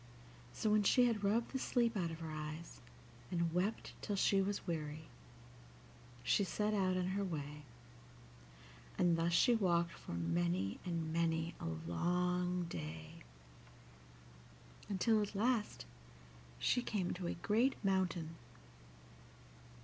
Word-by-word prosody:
So 210 - 0
when 210 0 +5
she 245 +5 +5
had 225 -4 +1
rubbed 220 +4 +1
the 265 - -2
sleep 235 -3 +1
out 175 -4 0
of 165 0 -7
her 160 -1 -5
eyes, 155 +2 -6 0.5
and 170 -2 0
wept 190 +5 -1
till 205 - -2
she 195 0 +3
was 200 +1 -2
weary, 155 -2 -3 1.2
she 205 - +3
set 210 +2 0
out 185 -2 +2
on 185 0 0
her 200 +1 0
way, 150 -5 -4 1.4
and 175 -2 +4
thus 165 +1 +1
she 240 +8 +5
walked 170 -6 +2
for - - -8
many 85 +3 0
and 165 -3 -2
many 165 0 +1
a - - -4 0.2
long 180 - +1
day, 80 - -7 1.7
until 215 +3 +3
at 205 0 -3
last 225 - 0 0.7
she 155 - +2
came 205 -7 -1
to 180 -1 -4
a - - -2
great 225 +9 +2
mountain. 180 -4 0
180 Hz, 130 wpm, -37 LUFS, 160-205 Hz, 1.7 s, when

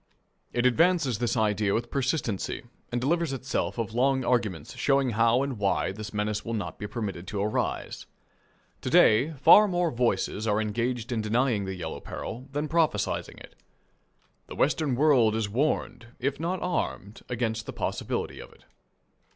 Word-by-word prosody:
It 120 0 0
advances 155 - +3
this 120 0 0
idea 105 -2 +1
with 120 +1 -3
persistency, 130 - -1 0.3
and 120 - 0
delivers 160 +3 0
itself 130 -1 -2
of 110 -2 -3
long 130 +1 +2
arguments 110 -9 -1
showing 135 0 +2
how 115 +3 +3
and 135 -6 -4
why 100 -1 +1
this 105 +2 -7
menace 105 0 -2
will 115 - -3
not 105 - -5
be 105 - -4
permitted 100 -6 -5
to 105 - -3
arise. 105 - -2 0.7
To - - -3
day, 130 +9 +5
far 180 +9 +7
more 175 -3 0
voices 115 -2 0
are 105 0 +2
engaged 115 +3 -2
in 115 -2 0
denying 110 -1 +1
the 95 0 -4
yellow 80 -3 -5
peril 130 +4 -7
than 145 +2 -2
in - - -7
prophesying 165 0 0
it. - - -13 0.9
The - - -8
Western 145 -1 +1
world 125 -6 +4
is 110 -2 0
warned, 125 0 -1
if 135 +2 -1
not 175 +3 -2
armed, 125 - -3
against 115 -2 -2
the - - -5
possibility - - -3
of - - -10
it. - - -22
120 Hz, 165 wpm, -27 LUFS, 110-140 Hz, 0.9 s, far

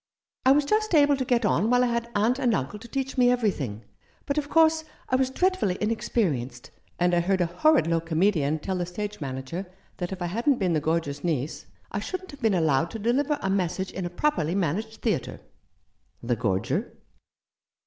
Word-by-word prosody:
I - - +8
was 290 +1 +4
just 430 +2 +1
able 290 -1 +5
to 265 - -2
get 245 -3 +1
on 205 +2 +2
while 245 0 +4
I 240 -1 +1
had 235 0 -2
uncle 240 +6 +2
and 235 -4 +3
aunt 195 +9 -4
to 235 - -10
teach 270 +2 -3
me 245 -1 +6
everything; 160 - -1 0.4
but, 280 +1 0
of 290 -1 -5
course, 320 -1 +4 0.3
I 255 - +2
was 260 0 +2
dreadfully 360 - +1
inex 220 +3 -2
perienced; 130 - -1 0.3
and 175 0 +2
I 175 - +4
heard 190 +2 +1
a 175 - +3
horrid 265 - +3
low 165 0 +1
comedian 160 -2 +1
tell 185 +4 -3
the 175 - -2
stage 205 +2 -5
manager 135 +7 -5 0.3
that 180 0 -4
if 190 - -5
I 175 - -2
hadn't 235 - +1
been 185 -6 +1
the 155 - +1
Gorger's 150 -3 -1
niece 155 -4 -2 0.2
I 200 - -2
shouldn't 370 - -5
have 285 - -13
been 220 -4 +3
allowed 160 -1 +2
to 225 - -6
deliver 265 +7 +1
a 195 - 0
message 190 0 -1
in 185 -2 -4
a - - -6
properly 175 - 0
managed 200 +5 -2
theatre! 205 - -1 0.4
" - - -40
"The 120 0 0
Gorger?" 100 -4 -1
200 Hz, 205 wpm, -26 LUFS, 165-250 Hz, 0.4 s, I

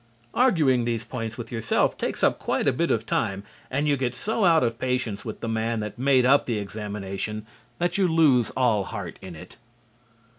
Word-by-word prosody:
Arguing 155 - +3
these 115 -1 -1
points 115 -1 -5
with 120 -2 -7
yourself 115 -2 +1
takes - - -4
up - - +3
quite - - -1
a - - +3
bit - - 0
of - - 0
time 95 0 -1 0.3
and 140 +3 0
you 145 - +3
get 125 -2 -2
so 220 - 0
out 165 -5 +5
of 115 -1 -1
patience 125 -5 -2
with 110 - -7
the - - -3
man 115 0 -1
that 105 +2 -6
made 130 -1 +4
up 140 +3 +4
the 115 -3 0
examination 105 0 -5 0.3
that 175 +2 0
you 190 - +4
lose 150 -9 +4
all 115 -6 +2
heart 100 -3 -6
in 95 -3 -9
it. 90 +3 -12
120 Hz, 195 wpm, -25 LUFS, 105-135 Hz, 0.3 s, out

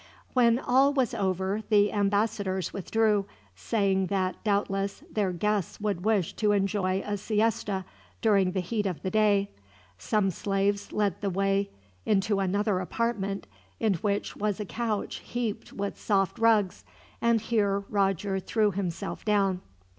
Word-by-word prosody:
When 235 -2 +4
all 265 +2 +3
was 265 -5 +1
over 190 +2 -1
the 205 -1 +4
ambassadors 200 -3 0
withdrew, 210 0 +1 0.3
saying 195 - +1
that, 185 -2 -1
doubtless, 200 -1 -1
their 200 -4 +1
guests 205 +1 -1
would 205 -4 -2
wish 210 -5 +1
to 210 -2 +2
enjoy 195 -1 0
a 205 0 -2
siesta 210 -2 0 0.3
during 195 -4 +3
the 190 - 0
heat 210 +3 -1
of 180 -4 -4
the 185 - -2
day. 205 -2 +3 0.5
Some 195 - +1
slaves 200 +2 -1
led 205 -4 0
the 200 - 0
way 195 +1 +1 0.3
into 200 0 +1
another 195 +1 +1
apartment, 200 0 -2 0.3
in 220 -3 +2
which 200 +3 -2
was 210 -1 -1
a 210 - -3
couch 220 0 -2
heaped 240 -4 -4
with 200 0 -4
soft 195 -3 +1
rugs, 220 -5 +3 0.4
and 235 -1 +3
here 205 -3 +1
Roger 195 -1 0
threw 210 +2 +1
himself 190 0 -4
down. 195 -3 +1
200 Hz, 140 wpm, -28 LUFS, 195-215 Hz, 0.5 s, When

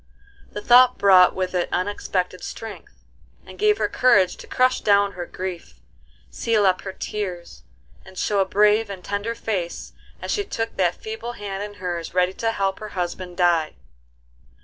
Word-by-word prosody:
The 210 - -6
thought 250 +2 +6
brought 185 -2 +6
with 185 -1 -2
it 180 -1 0
unexpected 185 -1 -2
strength, 225 -2 -9 0.4
and - - -13
gave 420 0 +3
her - - 0
courage 200 -8 +3
to - - -12
crush 255 0 +2
down 200 -1 +3
her 175 -2 -7
grief, 175 - -7 0.5
seal 220 -3 +1
up 185 -1 +2
her 190 - -6
tears, 185 -4 -6 0.4
and 190 0 -15
show 205 +1 0
a 195 - +3
brave 210 +2 +3
and 190 -2 -8
tender 205 +3 -3
face 185 -8 -4 0.3
as - - -5
she 410 - 0
took 225 - -4
that 180 -2 +2
feeble 225 +2 -6
hand 200 -3 -6
in 205 0 -6
hers 175 -3 -5
ready 180 0 +2
to 225 +3 -1
help 195 -3 -1
her 215 - -7
husband 180 0 -4
die. 170 -4 +2
195 Hz, 170 wpm, -23 LUFS, 180-215 Hz, 0.5 s, thought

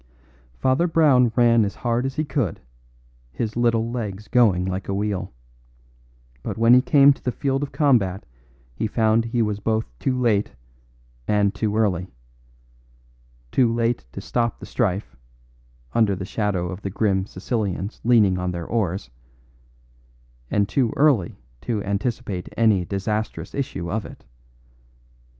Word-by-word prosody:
Father 130 - +2
Brown 140 -8 +4
ran 115 -2 +5
as 100 -2 -3
hard 120 +1 -1
as 135 - -6
he 155 - -1
could, 130 - -2 0.7
his 110 - -3
little 115 -1 +1
legs 105 -4 -5
going 105 -8 +3
like 95 +1 -3
a 100 - 0
wheel. 100 -2 -2 1.1
But - - -5
when 115 +1 +5
he 125 - +7
came 140 0 +6
to - - -21
the 125 - 0
field 135 +2 -1
of 145 - -4
combat 115 - +2 0.5
he - - -2
found 110 +1 +2
he 115 0 0
was 105 -1 -2
born 110 +1 0 0.2
too 130 -1 -1
late 110 -4 +1 0.7
and 105 -1 +2
too 105 0 -1
early 95 -5 +1 1.4
too 120 -3 +3
late 115 - -1
to - - -6
stop 120 -2 -1
the - - -8
strife, 95 - -2 0.8
under 105 -4 +3
the 95 0 -5
shadow 100 -4 -1
of 95 +2 -7
the 100 - -4
grim 95 -1 0
Sicilians 100 -1 -3
leaning 105 -6 +4
on 90 0 -2
their 85 -1 -4
oars, 95 - -2 1.4
and 100 -1 +1
too 120 +2 +1
early 135 - +3 0.2
to 105 -4 -2
anticipate 100 -2 -3
any 105 -6 +3
disastrous 100 -2 -3
issue 95 -11 -4
of 110 +1 -1
it. - - -14
110 Hz, 145 wpm, -23 LUFS, 95-120 Hz, 1.4 s, he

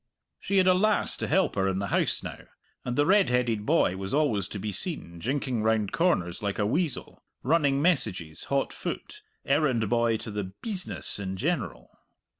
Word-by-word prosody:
She 200 - -1
had 190 - +5
a 185 - +6
lass 210 +3 +2
to - - -3
help 190 +4 +2
her 95 -1 +1
in 95 -1 0
the 100 0 -2
house - - +1
now, - - -6 0.4
and 125 - -3
the 145 - +3
red 195 -4 +4
headed 120 -4 0
boy 145 - +3
was 95 +6 -3
always 115 -11 +1
to - - -6
be 105 +2 -3
seen, 90 - -3
jinking 130 +2 -1
round 110 -2 +1
corners 125 - +1
like 100 -1 -2
a 105 - +1
weasel, 150 - -2 0.2
running 145 -1 +2
messages 95 - 0
hot 140 0 0
foot, 425 - -6 0.2
errand 135 -6 +2
boy 115 -1 +2
to 110 - -6
the 100 -2 -4
"bisness" 195 - -1
in 95 -1 -4
general. 125 - -2
120 Hz, 185 wpm, -27 LUFS, 100-160 Hz, 0.4 s, a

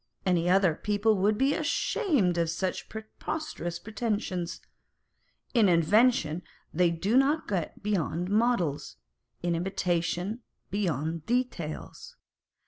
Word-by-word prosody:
Any 175 -2 +2
other 185 -2 +4
people 210 +5 +1
would 205 +3 +2
be 270 +3 +3
ashamed 300 - +1
of 165 -1 +1
such 180 +3 -3
preposterous 220 - -5
pretensions. 205 -4 -3 0.9
In 225 -6 +5
invention, 175 -1 +3 0.3
they 175 +1 +3
do 185 +7 0
not 285 +4 +3
get 185 -3 -3
beyond 180 -4 -1
models; 205 - +1 0.5
in 175 -1 +1
imitation, 180 +4 -1 0.3
beyond 165 -5 -2
details. 240 -11 -3
190 Hz, 105 wpm, -28 LUFS, 170-225 Hz, 0.9 s, In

